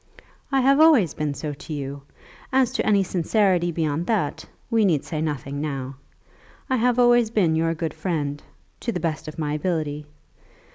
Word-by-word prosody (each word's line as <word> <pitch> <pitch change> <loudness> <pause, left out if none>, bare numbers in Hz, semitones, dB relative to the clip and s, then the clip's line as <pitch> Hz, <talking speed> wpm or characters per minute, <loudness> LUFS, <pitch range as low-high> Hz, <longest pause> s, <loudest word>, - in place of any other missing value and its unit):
"I 270 -1 +3
have 275 +2 +4
always 295 - +5
been 150 -2 -2
so 150 0 -4
to 150 +2 -8
you. 140 -1 -5 0.5
As 260 -2 +3
to - - -1
any 200 -2 +3
sincerity 180 0 +1
beyond 160 0 -1
that 160 -8 -1 0.3
we 225 -1 +3
need 165 -8 +2
say 155 -2 -3
nothing 145 -2 -3
now. 135 -3 -4 0.7
I 260 - +3
have 245 +1 +2
always 240 -2 +5
been 185 -8 +2
your 165 +1 +1
good 160 -1 -3
friend, 145 -5 -3 0.4
to 235 - -2
the 180 - -3
best 160 -2 -3
of 155 - -8
my 150 -2 -2
ability. 150 -2 -2
165 Hz, 175 wpm, -23 LUFS, 150-215 Hz, 0.7 s, always